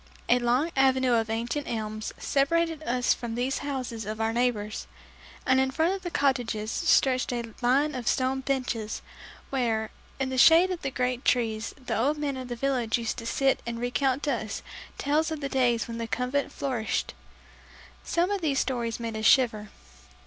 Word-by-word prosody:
A 245 - +5
long 250 +7 +1
avenue 260 -2 +3
of 225 -1 +1
ancient 235 +6 -2
elms 215 -1 -3
separated 325 +3 +1
us 250 -3 +1
from 235 -2 -5
these 250 +3 -1
houses 255 -5 -4
of 215 +2 -5
our 225 0 0
neighbors, 225 -3 -1 0.6
and 260 -1 +4
in 265 0 +2
front 320 +7 +1
of 390 - -4
the 355 - -4
cottages 240 -8 0
stretched 255 -2 +2
a 235 -2 -4
line 275 +5 +3
of 250 -4 -5
stone 260 +3 +1
benches, 255 -5 -2 0.5
where, 225 -5 0 0.3
in 265 -1 0
the 260 -1 -1
shade 335 +6 +7
of 360 - -4
the 270 - -2
great 250 0 -1
trees, 225 -3 0
the 250 -4 -4
old 275 +8 +1
men 290 -2 -2
of 260 -1 -6
the 240 - -4
village 245 -3 0
used 230 -1 -3
to 230 - -6
sit 270 +2 +2
and 235 0 -3
recount 255 +3 0
to 290 - +1
us 220 -3 -4 0.3
tales 305 +3 +1
of 315 -2 -4
the 280 -1 -3
days 245 -3 +1
when 230 0 -5
the 230 - -3
Convent 250 +4 -1
flourished. 250 -3 -2 0.9
Some 350 +3 +1
of 400 -2 -1
these 290 -4 0
stories 240 -4 -1
made 230 -1 -4
us 220 0 -3
shiver. 220 -5 +3
250 Hz, 185 wpm, -27 LUFS, 230-275 Hz, 0.9 s, shade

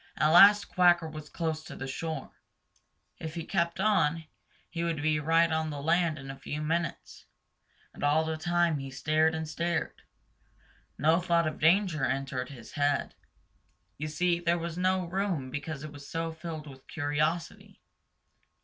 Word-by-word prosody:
At 155 - +3
last 200 +5 +8
Quacker 175 -2 +4
was 155 -1 -9
close 160 -2 -3
to - - -9
the 135 - -6
shore. 155 +4 -5 0.9
If 160 0 -6
he 165 - -3
kept 170 -2 -1
on, 165 -6 +2 0.4
he 170 -1 -4
would 165 -2 -1
be 155 0 +1
right 165 +2 +3
on 160 0 0
the 145 -1 -5
land 165 +1 +1
in 135 -1 -7
a 135 - -11
few 145 +2 -5
minutes. 165 +2 -3 0.7
And - - -9
all 150 +2 +3
the 160 0 -2
time 170 -1 +1
he 135 0 -6
stared 155 +4 +1
and 160 0 -3
stared. 170 +2 -2 1.0
No 160 +4 +3
thought 170 -2 +2
of 155 - -3
danger 170 -2 +3
entered 130 -1 -2
his 125 -5 -11
head. 145 -1 0 0.9
You 155 - -3
see, 170 +2 +1
there 170 0 +1
was 170 -1 -4
no 185 0 +1
room 175 -7 -2
because 145 +1 -5
it 155 - -7
was 145 -1 -11
so 165 0 -2
filled 160 -1 -7
with 135 -3 -13
curiosity. 155 +2 -2
160 Hz, 165 wpm, -29 LUFS, 150-170 Hz, 1.0 s, last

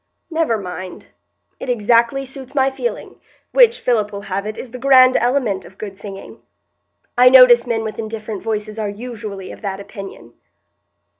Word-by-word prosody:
"Never 320 -8 +1
mind; 185 -1 -8 0.5
it - - -6
exactly 235 +3 +2
suits 270 +1 -11
my 270 -1 +2
feeling, 485 - -5 0.3
which, 485 -2 +5
Philip 215 -4 0
will 200 -1 -6
have 200 +1 -4
it, 215 - -5
is 250 - -8
the 250 - -8
grand 255 -1 +6
element 240 -5 +1
of 190 - -16
good 200 -2 -7
singing. 195 0 -10 0.7
I 250 +1 +7
notice 250 -2 +7
men 225 -2 -1
with 215 -1 -6
indifferent 215 -2 -5
voices 215 0 -4
are 210 -2 -2
usually 210 -3 -7
of - - -12
that 195 -2 -4
opinion." 195 - -10
225 Hz, 160 wpm, -19 LUFS, 200-255 Hz, 0.7 s, I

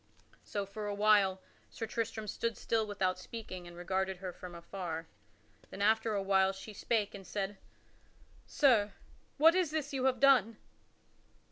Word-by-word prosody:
So, 205 -1 -3
for 210 +2 -6
a 205 - -2
while, 200 -2 +4 0.3
Sir 225 - -5
Tristram 225 -1 -3
stood 230 +3 -2
still 220 -2 0
without 185 -3 -1
speaking 185 -4 -8
and 175 0 -11
regarded 190 +2 -1
her 185 -1 -6
from 180 0 -9
afar. 170 -1 -5 0.6
Then 200 - -4
after 220 +1 +3
a 200 - 0
while 195 0 +3
she 195 +3 -9
spake 210 0 0
and 195 -2 -10
said, 200 -1 -3 0.9
"Sir, 225 -8 +3 0.4
what 320 +3 +7
is 365 -3 +2
this 300 -1 -3
you 265 -1 0
have 255 -2 +2
done?" 245 -5 +5
205 Hz, 155 wpm, -33 LUFS, 190-230 Hz, 0.9 s, what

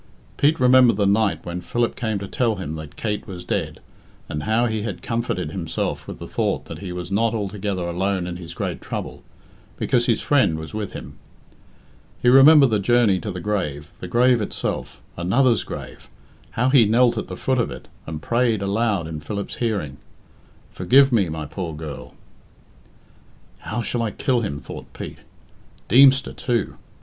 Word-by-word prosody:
Pete 155 +3 +2
remembered 125 -2 +6
the 100 - +2
night 100 +1 +1
when 85 +1 -4
Philip 120 +3 -1
came 110 -3 -2
to 100 0 -6
tell 115 +1 0
him 85 -6 -5
that 80 -2 -9
Kate 105 -1 -3
was 90 -3 -8
dead, - - -2 0.5
and 75 - -4
how 110 +2 +2
he 110 -2 -1
had 110 - -5
comforted 115 -9 -2
himself 85 -3 -3
with - - -7
the - - -8
thought - - -1
that 80 - -8
he 95 -1 -6
was 90 0 -6
not 115 +3 +1
altogether 100 -2 -3
alone 95 +1 -1
in 90 0 -5
his 85 -2 -9
great - - -3
trouble, - - -6 0.6
because 120 -1 +1
his 115 - +2
friend 130 - +2
was 80 +4 -8
with 105 -2 -4
him. 70 +4 -9 1.0
He 120 - +3
remembered 135 0 +8
the 105 - +2
journey 110 -2 +3
to 105 - -5
the 90 -2 -4
grave, 85 -7 -3
the - - -6
grave 125 0 +3
itself 105 - -4 0.2
another's 115 +6 +2
grave - - -9 0.4
how 125 +3 +1
he 130 -4 +6
knelt 120 +3 +4
at - - -5
the - - -7
foot 130 -1 0
of 120 - +1
it, - - -9 0.2
and 80 -2 -6
prayed 115 -2 +1
aloud 100 -3 0
in 80 -1 -5
Philip's 100 +7 -5
hearing, 100 - -2 0.7
"Forgive 135 +10 +4
me, 100 -8 +2
my 80 -1 -4
poor 85 0 -5
girl!" 75 -5 -8 1.4
"How 120 - -4
shall 120 +3 -2
I 115 - 0
kill 125 +3 0
him?" 100 -10 -3
thought - - -10
Pete. - - -8 0.7
Deemster 135 +3 +6
too! 120 -3 -2
105 Hz, 175 wpm, -22 LUFS, 90-120 Hz, 1.4 s, remembered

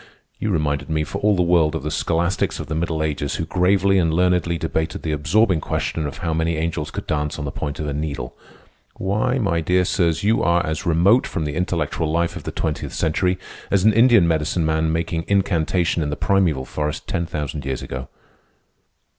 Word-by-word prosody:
You 110 - -1
reminded 75 -5 -1
me 80 -1 0
for - - -5
all 105 0 +3
the 90 - +2
world 85 -3 +3
of 80 - -4
the 75 - -3
scholastics 85 +4 0
of - - -4
the 80 - -5
Middle 80 -1 -1
Ages 75 -2 -2
who 80 - -2
gravely 95 +3 +3
and 80 -3 +2
learnedly 90 0 +2
debated 80 0 -2
the 80 - -1
absorbing 80 +4 +2
question 80 +1 -2
of 70 - -7
how 80 - 0
many 80 0 0
angels 80 -1 -2
could - - -6
dance 75 0 -2
on 75 - -4
the 70 - -3
point 70 +2 -4
of 75 - -2
a 75 - -2
needle. 70 -5 -4 0.6
Why, 110 +7 0
my 95 -9 0
dear 90 +2 +2
sirs, 85 -2 +1
you 110 +3 +3
are 85 0 +2
as 80 +2 -3
remote 90 +9 +4
from 80 - -3
the 75 - -3
intellectual 80 -3 -1
life 85 +1 0
of - - -8
the - - -3
twentieth 80 -2 -3
century 90 +3 +1 0.3
as 100 -2 +2
an 110 +1 +5
Indian 115 -5 +5
medicine 80 +1 0
man 80 0 +1
making 80 +1 -2
incantation 90 -3 +1
in 75 - -1
the 75 - -2
primeval 85 -10 +1
forest 75 +2 -3
ten 85 -4 -2
thousand 75 -2 -4
years 65 -1 -3
ago." 65 0 -6
80 Hz, 205 wpm, -21 LUFS, 75-90 Hz, 0.6 s, an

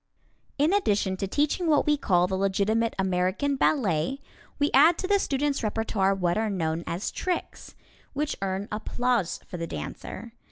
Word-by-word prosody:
In 300 +6 +3
addition 205 - +1
to 195 - -2
teaching 295 - 0
what 300 -3 +3
we 300 - +3
call 180 -10 +2
the 190 +1 -2
legitimate 200 +4 +1
American 190 +9 0
Ballet, 250 - +1 0.4
we 290 0 +1
add 320 +6 +6
to 370 - -3
the 405 0 +3
students' 285 -3 0
repertoire 215 -3 0
what 180 0 0
are 220 -1 0
known 165 -4 -1
as 175 +4 -3
"tricks," 365 -1 -4 0.4
which 300 +1 -1
earn 195 +1 -2
applause 225 -1 -1
for 180 - -7
the 165 0 -4
dancer. 230 +6 -7
215 Hz, 160 wpm, -26 LUFS, 190-285 Hz, 0.4 s, add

